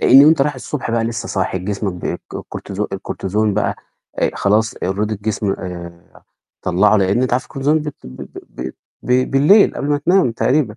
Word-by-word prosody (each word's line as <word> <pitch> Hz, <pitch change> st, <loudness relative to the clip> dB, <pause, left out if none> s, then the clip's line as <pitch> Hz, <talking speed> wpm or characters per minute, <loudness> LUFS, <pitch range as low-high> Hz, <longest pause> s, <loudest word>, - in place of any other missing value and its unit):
لإن 135 Hz, +2 st, +8 dB
أنت 155 Hz, -3 st, +5 dB
رايح 145 Hz, +1 st, 0 dB
الصبح 130 Hz, 0 st, -4 dB
بقى 115 Hz, -1 st, +1 dB
لسه 115 Hz, 0 st, -3 dB
صاحي، 95 Hz, -1 st, -1 dB
جسمك 100 Hz, +1 st, -3 dB
ب 90 Hz, -, -9 dB
الكو -, -, -5 dB
الكورتيزون 100 Hz, +1 st, -5 dB
الكورتيزون 100 Hz, +2 st, -1 dB
بقى 105 Hz, -, 0 dB, 0.4 s
أ -, -, +2 dB
خلاص 110 Hz, +2 st, +2 dB
already 95 Hz, +2 st, -3 dB
الجسم 105 Hz, -1 st, -1 dB
آآ، 85 Hz, -3 st, -9 dB, 0.4 s
طلَّعه 95 Hz, +4 st, +3 dB
لإن 100 Hz, +5 st, +2 dB
أنت 130 Hz, -, 0 dB
عارف 125 Hz, +1 st, +1 dB
الكورتيزون 145 Hz, +3 st, 0 dB
ب 150 Hz, 0 st, -4 dB
ب -, -, -5 dB
ب 65 Hz, 0 st, -10 dB, 0.2 s
ب 65 Hz, -, -5 dB, 0.3 s
ب 125 Hz, +1 st, +1 dB
بالليل 150 Hz, +10 st, +5 dB
قبل 140 Hz, -, -3 dB
ما 145 Hz, 0 st, +2 dB
تنام 175 Hz, -4 st, +3 dB
تقريبًا. 125 Hz, -2 st, +1 dB
110 Hz, 185 wpm, -18 LUFS, 95-135 Hz, 0.4 s, لإن